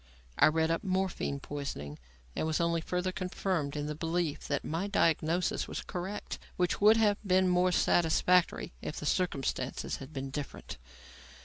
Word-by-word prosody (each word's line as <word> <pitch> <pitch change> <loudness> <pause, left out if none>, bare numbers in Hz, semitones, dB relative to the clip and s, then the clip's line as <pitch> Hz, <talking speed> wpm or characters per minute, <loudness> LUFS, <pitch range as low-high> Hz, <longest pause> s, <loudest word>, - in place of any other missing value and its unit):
I - - +8
read 160 +1 +2
up 165 - -1
morphine 185 -7 -1
poisoning 135 - -6 0.4
and - - -1
was 160 - 0
only 170 -1 +1
further 180 +2 -1
confirmed 180 -5 -2
in 145 0 -2
the 150 - -3
belief 165 0 -2
that 145 - -1
my 165 +6 -2
diagnosis 170 -2 +1
was - - -5
correct; 190 +3 -5 0.2
which 180 +1 0
would 215 +2 +7
have 210 -2 +3
been 185 -1 +3
more 180 0 +3
satisfactory 175 - +3
if - - -5
the - - -5
circumstances 135 -7 -1
had 135 +2 -10
been 135 -2 -5
different. 145 0 -6
170 Hz, 155 wpm, -31 LUFS, 150-185 Hz, 0.4 s, I